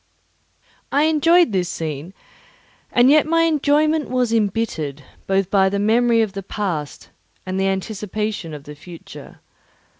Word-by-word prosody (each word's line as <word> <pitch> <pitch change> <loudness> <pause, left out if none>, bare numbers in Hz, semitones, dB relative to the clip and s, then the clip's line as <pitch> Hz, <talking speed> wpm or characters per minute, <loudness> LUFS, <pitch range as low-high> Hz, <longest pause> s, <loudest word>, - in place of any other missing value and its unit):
I 285 +2 +3
enjoyed 325 +1 +4
this 185 -3 -1
scene, 160 +3 -5 0.8
and 245 +1 +4
yet 305 0 +4
my 330 +1 +3
enjoyment 305 0 +1
was 250 -2 0
embittered 195 -10 -1 0.2
both 195 -1 0
by 190 -1 +4
the 200 - -2
memory 230 +2 +3
of 205 -3 -4
the 195 - -5
past 180 -7 -5 0.3
and 185 0 -3
the 195 - +1
anticipation 210 -1 -3
of 145 - -10
the 150 - -10
future. 165 +3 -13
210 Hz, 140 wpm, -20 LUFS, 185-255 Hz, 0.8 s, enjoyed